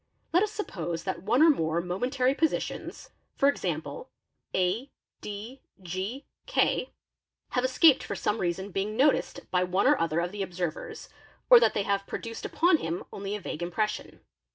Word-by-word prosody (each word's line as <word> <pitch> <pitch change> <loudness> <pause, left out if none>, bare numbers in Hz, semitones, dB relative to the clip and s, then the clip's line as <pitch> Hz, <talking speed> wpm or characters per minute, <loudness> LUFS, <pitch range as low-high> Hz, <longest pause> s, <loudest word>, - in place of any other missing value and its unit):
Let 355 - +5
us 425 0 +1
suppose 175 - -4
that 190 - -3
one 235 - +3
or 325 - +8
more 160 - 0
momentary 250 +9 0
positions, 320 +2 -2 0.2
for 275 - +3
example, 470 +10 -2 0.4
a, 190 +9 0 0.3
d, 215 +6 -7 0.2
g, 190 - -5 0.2
k, - - +1 0.6
have 250 - 0
escaped 260 +3 +5
for - - -4
some 210 - -1
reason 190 +3 -2
being 205 +3 -2
noticed 280 +2 +2
by 180 0 +3
one 185 +4 +1
or 290 +2 +4
other 165 0 +1
of 175 +1 -1
the 205 0 -5
observers 175 -3 -4 0.4
or - - +11
that - - +3
they 205 - +1
have 200 0 -1
produced 230 0 -6
upon 345 0 +3
him 170 - -3
only 200 +1 -4
a - - -4
vague 170 -4 -6
impression. 210 +5 -3
205 Hz, 165 wpm, -28 LUFS, 180-270 Hz, 0.6 s, or